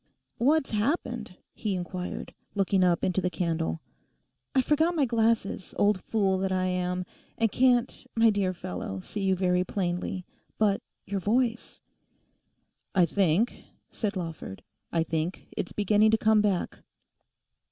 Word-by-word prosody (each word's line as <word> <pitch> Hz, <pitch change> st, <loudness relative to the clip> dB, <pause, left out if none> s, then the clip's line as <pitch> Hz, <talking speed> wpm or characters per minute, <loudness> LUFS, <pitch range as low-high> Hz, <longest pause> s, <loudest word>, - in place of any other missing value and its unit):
'What's 290 Hz, +4 st, +3 dB
happened?' 230 Hz, -, -1 dB, 0.2 s
he 210 Hz, -4 st, -2 dB
inquired, 180 Hz, 0 st, -5 dB, 0.2 s
looking 195 Hz, -1 st, +2 dB
up 175 Hz, -1 st, +2 dB
into 185 Hz, +1 st, +1 dB
the 180 Hz, -, 0 dB
candle. 165 Hz, -3 st, -1 dB, 0.7 s
'I 260 Hz, -, +4 dB
forgot 320 Hz, +5 st, +2 dB
my 295 Hz, -4 st, +3 dB
glasses, 225 Hz, -5 st, 0 dB
old 205 Hz, -2 st, +3 dB
fool 195 Hz, -4 st, +1 dB
that 190 Hz, 0 st, -1 dB
I 185 Hz, 0 st, +1 dB
am, 180 Hz, 0 st, -1 dB, 0.3 s
and 225 Hz, -2 st, +2 dB
can't, 250 Hz, 0 st, +2 dB
my 225 Hz, -1 st, +5 dB
dear 200 Hz, -3 st, +1 dB
fellow, 95 Hz, -, -5 dB
see 205 Hz, -, -5 dB
you 190 Hz, -1 st, +2 dB
very 180 Hz, -1 st, +2 dB
plainly. 180 Hz, -1 st, -2 dB, 0.3 s
But 205 Hz, -2 st, +2 dB, 0.2 s
your 195 Hz, 0 st, -2 dB
voice—' 230 Hz, +4 st, 0 dB, 1.1 s
'I 180 Hz, -2 st, +6 dB
think,' 190 Hz, +5 st, +1 dB, 0.3 s
said 210 Hz, -2 st, -2 dB
Lawford, 165 Hz, -, -6 dB, 0.3 s
'I 165 Hz, -1 st, +2 dB
think 165 Hz, +2 st, -3 dB
it's 175 Hz, -, -3 dB
beginning 210 Hz, +1 st, +3 dB
to 220 Hz, -, +4 dB
come 220 Hz, -1 st, +4 dB
back. 200 Hz, -4 st, 0 dB
195 Hz, 140 wpm, -28 LUFS, 180-225 Hz, 1.1 s, I